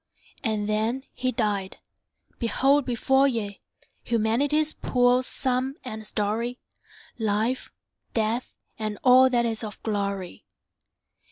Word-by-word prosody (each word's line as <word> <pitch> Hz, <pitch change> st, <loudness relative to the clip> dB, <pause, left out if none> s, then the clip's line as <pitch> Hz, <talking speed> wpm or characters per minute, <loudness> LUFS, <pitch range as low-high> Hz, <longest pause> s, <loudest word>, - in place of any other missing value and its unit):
And 215 Hz, -3 st, 0 dB
then 220 Hz, +5 st, 0 dB
he 255 Hz, 0 st, -1 dB
died! 205 Hz, -5 st, -1 dB, 0.6 s
Behold 270 Hz, +4 st, +3 dB
before 265 Hz, +3 st, +3 dB
ye 210 Hz, -6 st, -3 dB, 0.4 s
Humanity's 275 Hz, +7 st, +1 dB
poor 245 Hz, 0 st, +3 dB
sum 260 Hz, +1 st, -1 dB
and 220 Hz, -4 st, -6 dB
story; 225 Hz, +4 st, -1 dB, 0.6 s
Life, 220 Hz, +4 st, 0 dB, 0.4 s
Death, 225 Hz, +2 st, 0 dB, 0.2 s
and 215 Hz, -1 st, -3 dB
all 255 Hz, +1 st, +7 dB
that 240 Hz, -2 st, +2 dB
is 225 Hz, -1 st, -2 dB
of 210 Hz, -2 st, -6 dB
glory. 200 Hz, -4 st, -3 dB
230 Hz, 105 wpm, -26 LUFS, 215-255 Hz, 0.6 s, all